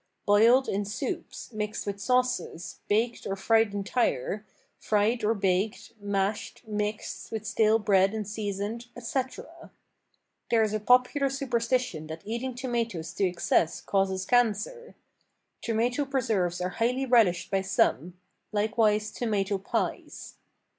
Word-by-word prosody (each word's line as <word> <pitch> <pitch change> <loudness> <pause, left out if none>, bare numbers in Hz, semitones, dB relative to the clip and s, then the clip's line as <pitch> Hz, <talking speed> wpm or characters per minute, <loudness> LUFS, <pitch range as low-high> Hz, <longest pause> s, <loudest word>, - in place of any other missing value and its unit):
Boiled 230 +6 +5
in 200 +1 -1
soups, 210 +3 -5
mixed 210 0 -3
with 200 -1 -4
sauces, 250 -8 -1
baked 230 +3 0
or 195 - -1
fried 225 +2 +3
entire, 205 - -1 0.4
fried 220 +3 +1
or 220 +2 +2
baked, 195 +1 -1
mashed, 200 +3 -2
mixed 210 0 -4
with 220 -1 -4
stale 220 -1 +3
bread 195 -3 +3
and 215 -2 -4
seasoned, 210 +2 -4
etc. 255 +2 -5 0.8
There 230 -1 +4
is 215 -1 -1
a 215 - 0
popular 250 +5 +3
superstition 250 - -1
that 160 +1 -8
eating 235 +4 -3
tomatoes 235 -9 -3
to 195 - +1
excess 175 -2 +1
causes 190 -1 0
cancer. 245 - 0 0.7
Tomato 240 +5 0
preserves 215 - 0
are 180 - 0
highly 250 +3 +1
relished 225 -9 +3
by 195 -1 +2
some; 180 -3 +1 0.4
likewise 215 0 +1
tomato 205 -4 -1
pies. 195 - -3
215 Hz, 125 wpm, -28 LUFS, 195-240 Hz, 0.8 s, Boiled